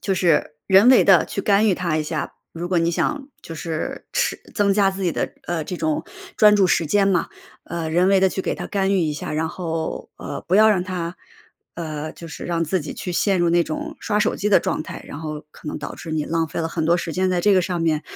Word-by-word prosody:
就 195 - 0
是 170 -4 +2 0.2
人 195 +5 +7
为 255 - +7
地 185 -4 +6
去 200 - -4
干 210 +1 +3
预 190 - +3
它 170 -4 -1
一 155 - -1
下。 155 0 -4 0.2
如 175 +1 -5
果 180 - +2
你 165 0 +2
想 275 - -1
就 165 - -9
是 160 0 -4
持 - - +1 0.2
增 205 -2 +3
加 200 -2 +4
自 195 0 -6
己 170 - +1
的， - - -2
呃， 170 -2 -1
这 180 - -5
种 155 -2 -1 0.3
专 210 -1 +6
注 195 - +4
时 170 -2 +2
间 200 +5 +3
嘛， 180 -4 +1 0.4
呃， 170 -1 -4
人 175 +4 +3
为 195 0 +5
地 190 - +4
去 190 0 -4
给 - - -1
它 - - -6
干 195 -1 0
预 195 - +3
一 155 -3 +1
下 150 - -5
然 160 +1 -1
后， 165 -2 -4
呃， - - -6
不 185 - +4
要 220 +1 +7
让 195 -4 +3
它 180 -2 -4 0.6
呃， 155 -2 -5
就 170 - -11
是 160 - -9
让 170 -1 0
自 175 +3 0
己 150 - -6
去 180 - -5
陷 195 +2 +2
入 175 -1 +2
那 170 0 +4
种 155 - -5
刷 210 -2 0
手 - - +1
机 210 - -1
的 205 - +6
状 - - -2
态， - - -8
然 145 - -8
后 155 -2 -6
可 150 - -10
能 - - -4
导 - - -6
致 165 - -8
你 155 -1 -1
浪 165 -1 -1
费 165 - -4
了 160 - -1
很 165 0 -2
多 170 +2 +4
时 170 -2 -4
间 185 0 +1
在 180 - +1
这 205 +3 +4
个 185 -2 +4
上 175 -2 -2
面， 160 -2 +1
175 Hz, 280 characters per minute, -22 LUFS, 160-195 Hz, 0.6 s, 人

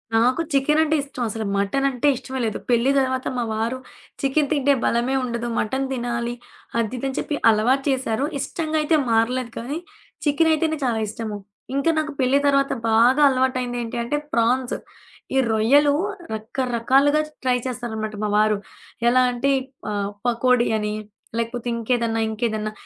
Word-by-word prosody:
నాకు 250 +7 +3
చికెనంటే 300 +3 +3
ఇష్టం 270 -3 -5
అసలు 220 +1 -4
మటనంటే 265 +6 +1
ఇష్టమే 260 +1 -6
లేదు. 220 - -2
పెళ్లి 240 +2 +3
తర్వాత 260 -1 -1
మా 245 - 0
వారు 225 +4 -1 0.4
చికెను 275 +1 +1
తింటే 285 -1 +3
బలమే 240 +3 +1
ఉండదు. 235 -1 -3
మటను 265 +5 -1
తినాలి 240 -1 -2 0.5
అది 230 +2 -1
ఇది 270 - -2
అని 265 - -4
చెప్పి 295 - -2
అలవాటు 235 +5 +3
చేశారు. 260 -1 0
ఇష్టంగా 315 +2 -2
అయితే 305 +2 +2
మారలేదు 230 +2 +1
కానీ, 275 +7 -4 0.5
చికెనైతేనే 315 +1 +2
చాలా 235 -3 0
ఇష్టము. 215 0 -5 0.4
ఇంకా 280 +4 +2
నాకు 305 0 -2
పెళ్లి 265 +2 +3
తర్వాత 275 -1 +3 0.2
బాగా 240 +6 +5
అలవాటైంది 255 -2 0
ఏంటి 230 +1 -5
అంటే 255 +5 -1 0.2
ప్రాన్స్. 240 +2 +1 0.6
ఈ - - +3
రొయ్యలు 275 +7 +4 0.4
రకరకాలుగా 255 +6 +1 0.2
ట్రై 250 -1 +2
చేస్తారనమాట 220 -4 -4
మా - - -1
వారు. 215 0 +3 0.5
ఎలా 255 +2 +5
అంటే 245 +3 0 0.4
ఆహ్, 200 -1 -2
పకోడీ 245 0 +3
అని 210 0 -2 0.4
లేకపోతే 230 +1 -3
ఇంకేదన్నా 230 -1 0
ఇంకేదన్నా 220 -1 -2
250 Hz, 140 wpm, -22 LUFS, 230-275 Hz, 0.6 s, బాగా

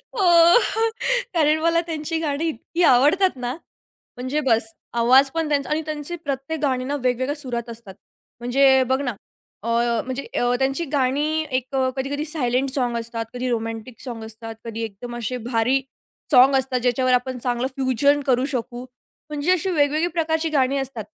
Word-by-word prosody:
हो 425 - -1 1.1
कारण 310 -2 +3
मला 335 +1 +3
त्यांची 320 0 -3
गाणी 305 0 -1
इतकी 325 +6 -3
आवडतात 305 +7 +4
ना, 250 0 -4 0.6
म्हणजे 260 +5 -2
बस. 225 -2 +1 0.2
आवाज 260 +4 +5
पण 325 0 -2
त्यांचा 285 -2 0
आणि 305 +1 0
त्यांचे 305 +2 -4
प्रत्येक 285 0 -4
गाणी 260 -4 0
ना 280 +3 -2
वेगवेगळ्या 255 +3 0
सुरात 245 -5 -5
असतात. 225 -4 -9 0.4
म्हणजे 265 +2 +4
बघ 260 0 +2
ना, 255 -3 -1 0.5
अ, - - -5 0.4
म्हणजे 260 +2 -4
अ, 245 0 +2
त्यांची 270 +5 0
गाणी 295 +4 +1
एक 260 +1 -6
अ, 260 -1 +2
कधी-कधी 285 +3 -2
सायलेंट 270 -4 0
सॉन्ग 245 -3 0
असतात, 230 0 -4
कधी 250 +1 -3
रोमॅन्टिक 225 0 -4
सॉन्ग 235 -4 -6
असतात, 225 +1 -9
कधी 230 0 -5
एकदम 225 +3 -7
असे 240 +2 -3
भारी 250 +3 +2 0.5
सॉन्ग 265 0 +7
असतात, 265 -1 -1
ज्याच्यावर 255 +1 +2
आपण 250 +1 0
चांगलं 245 +1 -1
फ्युजन 275 +2 +2
करू 255 0 +3
शकू. 240 +1 -5 0.4
म्हणजे 300 +3 0
अशी 370 +1 -1
वेगवेगळी 305 +1 +2
प्रकारची 320 -1 -1
गाणी 275 -2 +1
असतात 265 -5 -4
265 Hz, 160 wpm, -22 LUFS, 245-295 Hz, 1.1 s, सॉन्ग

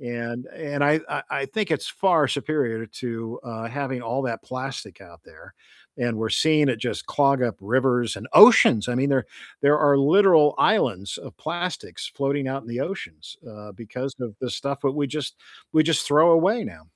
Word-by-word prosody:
And 120 0 -6
and 145 -2 -5
I 150 +2 +4
I - - -3
I 140 - -2
think 210 -4 -3
it's 155 - -1
far 175 -6 +2
superior 135 -6 -2
to, 115 +1 -7
uh, 115 -1 -7
having 130 -1 -4
all 120 +4 -3
that 115 -4 -4
plastic 130 -8 -7
out 85 -3 -16
there, - - -17 0.4
and 120 -2 -2
we're 110 0 -2
seeing 155 -2 +3
it 125 - 0
just 120 0 -4
clog 140 -2 +2
up 115 -4 -2
rivers, 125 +2 0
and - - -9
oceans, 110 +2 +7
I 125 - -1
mean, 135 +2 +1
there 130 -6 +1 0.4
there 145 +1 +4
are 145 -2 +4
literal 155 0 +5
islands 100 - +1
of - - -12
plastics 175 +1 -5
floating 140 -1 -1
out 135 +1 -4
in 115 - -15
the 120 +2 -4
oceans, 85 - -7
uh, 105 -1 -12
because 125 +6 -7
of 120 -4 -6
the 125 - -4
stuff 140 +2 -4
that 135 - +2
we 145 0 -1
just 150 0 -5 0.4
we 155 0 +4
just 165 -1 +1
throw 155 +4 +5
away 190 +8 +3
now. 80 -5 -10
135 Hz, 190 wpm, -23 LUFS, 115-150 Hz, 0.4 s, oceans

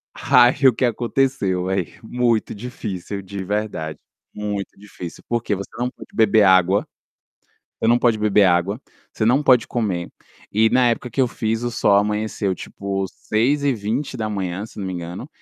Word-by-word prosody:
Ai 125 0 +5
o - - +7
que 125 - +1
aconteceu, 120 -6 0
velho 95 -2 -1 0.2
muito 120 -1 0
difícil 105 -4 -6
de 95 0 -6
verdade, 100 -6 -3 0.4
muito 105 -2 -4
difícil 95 -4 -10
porque 120 -3 -1
você 100 - -6
não 125 +1 0
pode - - -13
beber 110 -1 +4
água 95 +1 +4 0.9
você 110 - +1
não 120 +1 +5
pode 120 -3 +2
beber 105 -1 +4
água, 95 +5 +2 0.3
você 110 - -1
não 130 +5 +4
pode 125 -4 +5
comer 95 -8 -2 0.4
e 110 +2 +3
na 125 -1 +4
época 125 +1 -4
que 125 - -6
eu 125 - +3
fiz, 115 0 -2
o 120 - -1
sol 100 -3 +3
amanheceu 105 -1 0
tipo, 95 +1 -4
6h20 110 -6 -1
se - - -17
eu - - -4
não 95 - -3
me 95 - -4
engano, 90 - -6
105 Hz, 165 wpm, -21 LUFS, 95-120 Hz, 0.9 s, o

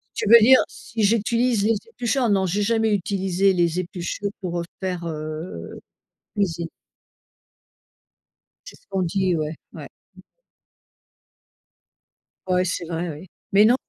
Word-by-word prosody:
Tu 210 - -1
veux 235 0 +10
dire 260 +4 +7
si 225 -2 -5
j'utilise 230 +1 +2
les 225 - +3
épluchures? 245 - 0
Non, 195 -2 +2
j'ai 195 +4 -1
jamais 220 0 +2
utilisé 195 -1 +1
les 175 -1 +1
épluchures 180 +3 -4
pour, 175 -3 -3
heu, - - -4 0.2
faire, 180 -2 -3
heu, 155 - -6 0.5
cuisine. 170 -5 -1 2.0
C'est - - -11
ce - - -33
qu'on 190 -2 -1
dit, 185 +1 +1
ouais, 155 0 -3 0.2
ouais. - - -8 2.6
Ouais, 180 0 +2
c'est 180 -1 -3
vrai, 170 +1 -3
oui, 155 +5 -8 0.3
mais 205 +2 +7
non, 240 - +5
190 Hz, 130 wpm, -23 LUFS, 170-215 Hz, 2.6 s, veux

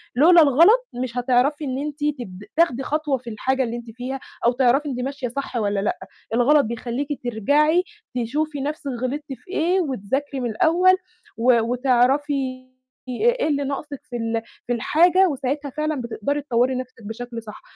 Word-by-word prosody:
لولا 335 +5 +7
الغلط 345 - +5
مش 250 0 -4
هتعرفي 260 +4 +2
إن 260 -1 -2
أنتِ 295 +1 -4 0.2
تب 190 -3 -8
تاخدي 270 -6 +3
خطوة 300 -2 0
في 240 -1 -10
الحاجة 260 +5 0
اللي 235 0 -3
أنتِ 235 -1 -8
فيها 255 +3 -5 0.3
أو 240 - +5
تعرفي 265 +4 +2
أنتِ 250 -2 -4
ماشية 270 0 -3
صح 275 0 -5
والّا 205 -2 0
لأ، 205 - -1 0.4
الغلط 280 +3 +4
بيخلّيكِ 235 +4 -3 0.2
ترجعي 295 - +2 0.4
تشوفي 295 +4 -2
نَفْسِك 290 -1 -3
غلطتِ 280 +2 -3
في 365 - -16
إيه 360 +2 +2
وتذاكري 270 - -2
من 240 - -1
الأول 355 +10 +4 0.4
و 235 0 +4
وتعرفي 255 +2 +1 0.4
إيه 480 - +1
اللي 285 -2 0
ناقصِك 280 +1 -5
في 245 - -6
ال 225 0 -1 0.3
في 245 - +1
الحاجة 350 - +4
وساعتها 280 +1 -2
فعلًا 305 -3 -1
بتقدري 240 +5 -2
تطوَّري 255 -1 +1
نَفْسِك 255 -2 -7
بشكل 230 +1 -6
صح. 210 - -10
265 Hz, 160 wpm, -22 LUFS, 240-295 Hz, 0.4 s, لولا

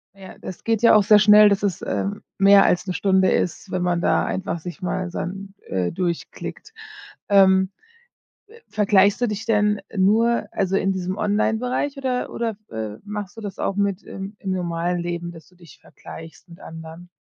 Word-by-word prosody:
Ja, 190 -1 -12
das 185 - -9
geht 225 -1 0
ja 230 - +6
auch 210 - +5
sehr 210 +1 +6
schnell, 210 0 +7
dass 200 0 0
es, 195 -4 -1
ähm, 200 +1 -3
mehr 195 0 +7
als 180 +2 +1
'ne 180 - -2
Stunde 190 -1 +2
ist, 185 - -1
wenn 185 -1 -1
man 175 -1 0
da - - +2
einfach 180 -3 -3
sich 175 +3 -9
mal 185 0 -2
dann, 195 +3 -6
äh, 90 -2 -1
durchklickt. 180 - -5 0.6
Ähm, 190 -1 +5 0.8
äh, 460 +3 -17
vergleichst 205 0 +3
du 245 - +2
dich 215 +1 -4
denn 210 -2 +1
nur, 220 +4 +2
also 195 -1 -1
in 195 0 +1
diesem 185 0 -3
Online-Bereich 220 +6 -1
oder 260 -2 -2
oder, 230 -2 -3 0.2
äh, 110 -2 -5
machst 205 0 -7
du - - -7
das 205 -2 -7
auch 195 - -1
mit 200 -1 -1
im 195 +2 -8
im 190 - -4
normalen 175 -1 -2
Leben, 170 0 -4
dass 160 -3 -14
du 180 - -25
dich 170 -5 -17
vergleichst 165 +2 -13
mit 170 +3 -14
anderen? 165 +2 -11
195 Hz, 185 wpm, -22 LUFS, 180-210 Hz, 0.8 s, schnell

